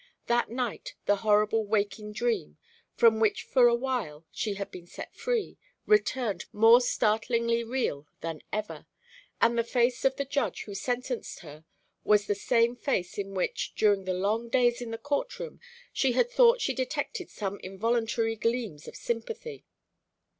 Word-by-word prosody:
That 240 0 +1
night 240 -1 -4
the 205 - +3
horrible 215 +1 +3
waking 210 0 -1
dream, 225 - -1 0.4
from 225 -2 +5
which 220 -2 +2
for 250 -2 +5
awhile 235 - -1
she 210 -2 -2
had 200 0 -5
been 175 -1 -10
free, 455 - -4 0.3
returned 255 - +1
more 225 +3 +7
startlingly 230 0 +1
real 230 - -2
than 165 -2 -5
ever, 215 0 -4 0.5
and 235 0 +4
the 235 - +2
face 245 +1 +1
of 265 0 +3
the 280 - -2
Judge 280 +1 -1
who 205 - -9
sentenced 245 +4 -3
her 155 -1 -12 0.4
was 210 -1 +4
the 205 - +1
same 230 +4 +2
face 205 -8 -2
in 195 -1 -4
which, 185 - -2
during 205 -3 +3
the 185 -1 -1
long 215 +5 -1
days 240 0 +2
in 240 - -5
the 225 - -4
court 290 - -2
room, - - -8 0.3
she 265 -2 +2
had 470 - +2
thought - - +5
she 270 - 0
detected 290 +7 -3
some 200 -1 -4
involuntary 225 +3 -1
gleams 225 -9 -2
of - - -9
sympathy. 435 - -5
230 Hz, 155 wpm, -28 LUFS, 205-250 Hz, 0.5 s, more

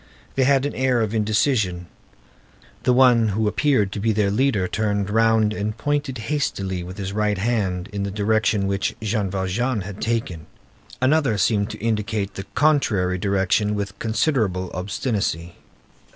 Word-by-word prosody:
They 130 - +2
had 135 0 +3
an 145 - -2
air 130 -2 +1
of 110 -1 -1
indecision. 105 -4 +1 1.0
The 125 - +4
one 125 -3 +5
who 105 +1 0
appeared 105 -3 +1
to 100 - -4
be 110 +2 +1
their 105 -2 +1
leader 105 -4 +1
turned 100 0 -1
round 110 -1 +3
and 110 +1 -3
pointed 145 0 -1
hastily 105 -8 -2
with 90 +2 -8
his 100 -1 -4
right 105 -1 0
hand 95 -4 -1
in 100 - -3
the 100 - -2
direction 105 0 +1
which 100 0 -1
Jean 110 -2 -1
Valjean 100 +5 -1
had 100 +1 -8
taken; 100 -9 -2 0.5
another 130 -4 +2
seemed 100 +1 +1
to 110 - -7
indicate 105 -2 -2
the 95 +1 -7
contrary 105 -12 +2
direction 100 +2 +1
with 100 -1 -4
considerable 110 - 0
obstinacy. 90 - -2
105 Hz, 150 wpm, -22 LUFS, 100-115 Hz, 1.0 s, one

